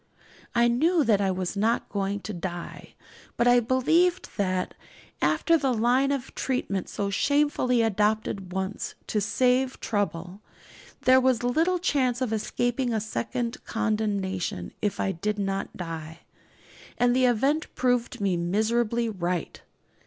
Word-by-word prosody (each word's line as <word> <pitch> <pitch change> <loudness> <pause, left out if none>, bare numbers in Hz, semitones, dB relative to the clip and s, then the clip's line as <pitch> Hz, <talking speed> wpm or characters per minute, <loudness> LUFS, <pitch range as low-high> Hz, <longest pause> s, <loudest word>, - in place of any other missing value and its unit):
I 235 0 +5
knew 310 +8 +3
that 215 -5 +3
I 195 - +2
was 185 +1 -2
not 220 +4 +1
going 200 0 -2
to 210 +3 -6
die; 175 -1 -7 0.4
but 235 - +3
I 245 0 +6
believed 295 +9 +2
that, 185 -3 -1 0.5
after 335 -1 +3
the 270 -3 +1
line 245 +4 +2
of 270 -2 -3
treatment 200 -8 -2
so 200 -1 -2
shamefully 280 -1 +2
adopted 210 -3 0
once, 190 +2 -3
to 210 - -1
save 255 +4 +1
trouble, 195 -2 -3 0.6
there 260 0 +5
was 255 -2 +2
little 325 +9 +2
chance 265 -8 +1
of 250 -4 -1
escaping 245 +3 -1
a 220 - +1
second 230 +2 -3
condemnation 200 - -2
if 205 -2 -1
I 195 - +1
did 205 +4 -2
not 195 -1 -3
die. 165 -2 -6 0.8
And 245 0 +3
the 255 0 +4
event 275 +7 +1
proved 245 -1 0
me 195 -3 +1
miserably 220 +6 +1
right. 180 -5 -3
225 Hz, 140 wpm, -26 LUFS, 195-255 Hz, 0.8 s, I